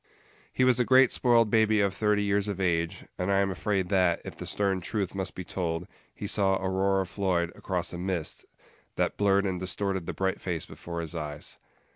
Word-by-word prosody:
He 130 Hz, -, +1 dB
was 125 Hz, -1 st, +4 dB
a -, -, +5 dB
great 130 Hz, 0 st, +5 dB
spoiled 115 Hz, -3 st, +3 dB
baby 110 Hz, -1 st, +4 dB
of 100 Hz, -2 st, +2 dB
thirty 105 Hz, -1 st, +1 dB
years 100 Hz, 0 st, +1 dB
of 100 Hz, -2 st, -3 dB
age; 85 Hz, -3 st, 0 dB
and 90 Hz, +1 st, -1 dB
I 100 Hz, -, +3 dB
am 100 Hz, 0 st, +2 dB
afraid 95 Hz, 0 st, -1 dB
that, 90 Hz, -4 st, +3 dB
if -, -, -7 dB
the -, -, -7 dB
stern 95 Hz, -2 st, 0 dB
truth 100 Hz, 0 st, -2 dB
must 95 Hz, -1 st, -3 dB
be 90 Hz, -, -5 dB
told, 85 Hz, -1 st, -3 dB, 0.3 s
he -, -, -6 dB
saw 95 Hz, -1 st, +2 dB
Aurora 95 Hz, 0 st, +1 dB
Floyd 90 Hz, -3 st, 0 dB
across 90 Hz, -3 st, -3 dB
a 85 Hz, -, -5 dB
mist, 90 Hz, -3 st, -3 dB, 0.5 s
that -, -, 0 dB
blurred 100 Hz, -1 st, +3 dB
and 95 Hz, -2 st, -1 dB
distorted 95 Hz, -1 st, -2 dB
the -, -, -2 dB
bright 95 Hz, 0 st, -1 dB
face 85 Hz, -4 st, -2 dB
before 85 Hz, -1 st, -6 dB
his 80 Hz, 0 st, -5 dB
eyes. 75 Hz, -3 st, -5 dB
95 Hz, 200 wpm, -28 LUFS, 90-100 Hz, 0.5 s, a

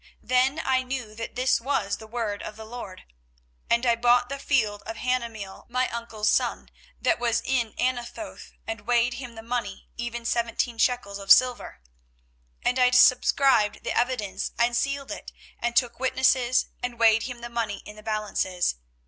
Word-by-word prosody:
Then 255 Hz, +4 st, +2 dB
I 260 Hz, -1 st, +2 dB
knew 255 Hz, -4 st, -5 dB
that 230 Hz, +1 st, -7 dB
this 250 Hz, -1 st, +2 dB
was 230 Hz, -6 st, -1 dB
the 220 Hz, -, -12 dB
word 220 Hz, -3 st, -3 dB
of 210 Hz, -, -7 dB
the 220 Hz, 0 st, -9 dB
LORD. 220 Hz, -5 st, -8 dB, 0.7 s
24:032:009 -, -, +6 dB
And 235 Hz, +2 st, -2 dB
I 235 Hz, -1 st, +4 dB
bought 245 Hz, +1 st, +3 dB
the 275 Hz, 0 st, -4 dB
field 220 Hz, -8 st, +1 dB
of 225 Hz, -, -4 dB
Hanameel 230 Hz, -6 st, -3 dB
my 255 Hz, +1 st, 0 dB
uncle's 230 Hz, -2 st, -3 dB
son, -, -, 0 dB, 0.3 s
that -, -, +1 dB
was 235 Hz, -1 st, +1 dB
in 240 Hz, -4 st, 0 dB
Anathoth, 250 Hz, +5 st, -3 dB
and 225 Hz, -1 st, -6 dB
weighed 245 Hz, 0 st, +3 dB
him 245 Hz, -2 st, -8 dB
the 225 Hz, -, -9 dB
money, 230 Hz, -4 st, -4 dB
even 240 Hz, 0 st, -4 dB
seventeen 235 Hz, 0 st, -1 dB
shekels 215 Hz, -6 st, 0 dB
of 195 Hz, 0 st, -1 dB
silver. 250 Hz, -, +4 dB, 0.8 s
24:032:010 -, -, +5 dB
And 250 Hz, +1 st, -1 dB
I 250 Hz, 0 st, +6 dB
subscribed 250 Hz, -3 st, +4 dB
the -, -, -2 dB
evidence, 215 Hz, -6 st, -1 dB
and 235 Hz, 0 st, +2 dB
sealed 275 Hz, +2 st, -1 dB
it, -, -, -7 dB, 0.3 s
and 240 Hz, 0 st, -2 dB
took 240 Hz, -2 st, +2 dB
witnesses, 255 Hz, -1 st, +2 dB, 0.2 s
and 245 Hz, -1 st, -4 dB
weighed 225 Hz, -1 st, +5 dB
him 240 Hz, -1 st, -8 dB
the 240 Hz, -, -6 dB
money 230 Hz, -4 st, -3 dB
in 210 Hz, -, -10 dB
the 215 Hz, -, -12 dB
balances. 205 Hz, -, -1 dB
235 Hz, 175 wpm, -26 LUFS, 220-250 Hz, 0.8 s, 24:032:009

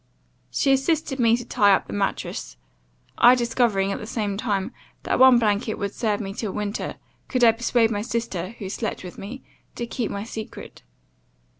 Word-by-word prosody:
She 275 Hz, -, +2 dB
assisted 275 Hz, 0 st, 0 dB
me 230 Hz, -1 st, +4 dB
to 245 Hz, -, -7 dB
tie 200 Hz, -4 st, +4 dB
up -, -, -3 dB
the -, -, -8 dB
mattrass; 195 Hz, -, -3 dB, 0.6 s
I 245 Hz, +1 st, +8 dB
discovering, 230 Hz, -5 st, +1 dB
at -, -, -3 dB
the -, -, -7 dB
same 210 Hz, -3 st, -2 dB
time, 205 Hz, 0 st, -1 dB, 0.3 s
that -, -, 0 dB
one 260 Hz, -1 st, +8 dB
blanket 215 Hz, -1 st, +1 dB
would 200 Hz, -1 st, -4 dB
serve 215 Hz, -3 st, -1 dB
me 195 Hz, -2 st, -5 dB
till 215 Hz, -1 st, -4 dB
winter, 210 Hz, 0 st, -3 dB, 0.3 s
could 255 Hz, -2 st, 0 dB
I 230 Hz, -, +8 dB
persuade 230 Hz, 0 st, +1 dB
my 205 Hz, -2 st, -1 dB
sister, 225 Hz, -4 st, -3 dB
who 200 Hz, -, -6 dB
slept 215 Hz, +2 st, -4 dB
with 180 Hz, -, -9 dB
me, 240 Hz, +7 st, -8 dB, 0.3 s
to 240 Hz, -, -3 dB
keep 235 Hz, -2 st, -3 dB
my 200 Hz, -, -4 dB
secret. 220 Hz, -1 st, -8 dB
225 Hz, 180 wpm, -24 LUFS, 200-240 Hz, 0.6 s, I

